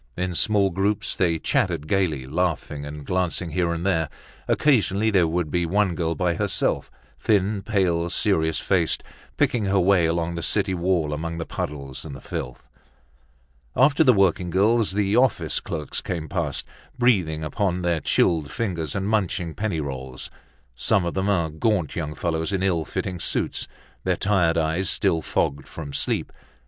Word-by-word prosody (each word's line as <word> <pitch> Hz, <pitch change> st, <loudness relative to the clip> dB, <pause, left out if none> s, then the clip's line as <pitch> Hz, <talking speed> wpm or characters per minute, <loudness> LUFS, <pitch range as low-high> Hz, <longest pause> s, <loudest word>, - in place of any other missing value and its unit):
In 90 Hz, 0 st, -1 dB
small 100 Hz, +2 st, +3 dB
groups 100 Hz, +4 st, 0 dB
they 85 Hz, -3 st, +1 dB
chattered 75 Hz, -1 st, 0 dB
gaily, 80 Hz, -8 st, 0 dB
laughing 75 Hz, -1 st, -2 dB
and 75 Hz, 0 st, -8 dB
glancing 90 Hz, -1 st, -1 dB
here 85 Hz, +1 st, +1 dB
and 85 Hz, +1 st, -3 dB
there. 80 Hz, -6 st, +1 dB, 0.4 s
Occasionally 110 Hz, -6 st, +2 dB
there 90 Hz, -5 st, +4 dB
would 80 Hz, -2 st, -1 dB
be 90 Hz, -1 st, +1 dB
one 100 Hz, +1 st, +2 dB
girl 85 Hz, -1 st, -1 dB
by 90 Hz, +1 st, +1 dB
herself, -, -, -1 dB, 0.3 s
thin, 100 Hz, -1 st, +1 dB
pale, 90 Hz, -5 st, +1 dB
serious 80 Hz, -4 st, +1 dB
faced, -, -, +1 dB, 0.3 s
picking 115 Hz, -4 st, +2 dB
her 95 Hz, 0 st, +2 dB
way 90 Hz, -2 st, +4 dB
along 85 Hz, +1 st, -1 dB
the 85 Hz, -, -4 dB
city 100 Hz, +2 st, +1 dB
wall 85 Hz, -4 st, 0 dB
among 85 Hz, +2 st, -4 dB
the 80 Hz, -, -3 dB
puddles 70 Hz, -3 st, -5 dB
and 75 Hz, -4 st, -7 dB
the -, -, -9 dB
filth. 60 Hz, -2 st, -6 dB, 1.1 s
After 140 Hz, +4 st, +5 dB
the 130 Hz, -, +7 dB
working 95 Hz, -4 st, +2 dB
girls, 105 Hz, +4 st, +2 dB
the 100 Hz, 0 st, +1 dB
office 125 Hz, -2 st, +2 dB
clerks 75 Hz, -1 st, -4 dB
came 80 Hz, -3 st, -4 dB
past, -, -, -2 dB, 0.3 s
breathing 90 Hz, -11 st, +2 dB
upon 90 Hz, +4 st, -1 dB
their 85 Hz, -2 st, +1 dB
chilled 80 Hz, -1 st, +2 dB
fingers 85 Hz, -10 st, -3 dB
and 100 Hz, 0 st, -1 dB
munching 90 Hz, -6 st, 0 dB
penny 100 Hz, -6 st, -2 dB
rolls. 65 Hz, -2 st, -6 dB, 0.4 s
Some 95 Hz, -, +2 dB
of 85 Hz, -, -2 dB
them 95 Hz, +1 st, 0 dB
are 85 Hz, -6 st, +1 dB
gaunt 90 Hz, +1 st, 0 dB
young 75 Hz, -2 st, -3 dB
fellows 80 Hz, +1 st, -1 dB
in 95 Hz, -1 st, 0 dB
ill 85 Hz, -5 st, +1 dB
fitting 90 Hz, +3 st, -4 dB
suits, -, -, -1 dB, 0.4 s
their -, -, +1 dB
tired 95 Hz, -5 st, +2 dB
eyes 80 Hz, +3 st, +1 dB
still 80 Hz, -, +2 dB
fogged 70 Hz, -2 st, -1 dB
from 75 Hz, -4 st, -8 dB
sleep. -, -, -1 dB
85 Hz, 165 wpm, -24 LUFS, 80-100 Hz, 1.1 s, the